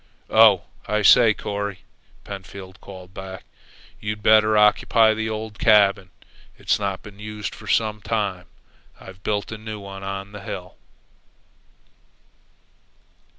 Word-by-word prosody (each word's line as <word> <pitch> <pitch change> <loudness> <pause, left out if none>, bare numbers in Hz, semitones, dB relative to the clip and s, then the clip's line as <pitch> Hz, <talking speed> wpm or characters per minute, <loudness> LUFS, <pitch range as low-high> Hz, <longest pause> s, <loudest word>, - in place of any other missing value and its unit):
"Oh, 110 -5 +6 0.2
I 105 0 0
say, 115 +3 +7
Corry," 100 -3 -5 0.4
Pentfield 95 -1 -9
called 95 -2 -12
back, 95 0 -8 0.6
"you'd 105 0 -5
better 110 0 +5
occupy 110 +1 +4
the 110 0 -3
old 110 -1 -6
cabin. 100 -4 +4 0.5
It's - - 0
not 100 -2 -3
been 100 -1 -13
used 105 0 -6
for - - -12
some 110 -1 0
time. 100 -6 -2 0.5
I've 95 0 -13
built 105 +1 -2
a 110 - -6
new 110 -1 -7
one 100 -1 -9
on 95 0 -6
the 105 -1 -9
hill." 90 -2 -7
105 Hz, 125 wpm, -22 LUFS, 95-110 Hz, 0.6 s, say